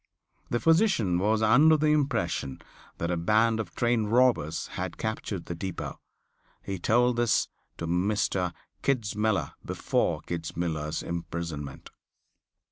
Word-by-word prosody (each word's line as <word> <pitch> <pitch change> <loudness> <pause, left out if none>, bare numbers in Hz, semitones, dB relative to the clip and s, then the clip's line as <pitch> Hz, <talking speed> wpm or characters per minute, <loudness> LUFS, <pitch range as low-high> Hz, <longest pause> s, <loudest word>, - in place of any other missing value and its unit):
The 120 - 0
physician 165 - +3
was 110 +3 +2
under 145 +9 +6
the 155 0 +2
impression 140 - 0 0.4
that 85 +1 -2
a 90 - 0
band 110 +6 +3
of 100 -6 -5
train 120 -2 +2
robbers 115 -10 +2
had - - -5
captured 110 -4 -3
the - - -4
depot. 95 +1 -5 0.6
He 95 -2 -4
told 120 +5 +3
this 120 -1 +2 0.3
to 85 - -4
Mr. 90 +1 0 0.3
Kitzmiller 110 -5 0
before - - 0
Kitzmiller's 80 -2 -3
imprisonment. 85 -4 -5
105 Hz, 120 wpm, -28 LUFS, 85-120 Hz, 0.6 s, under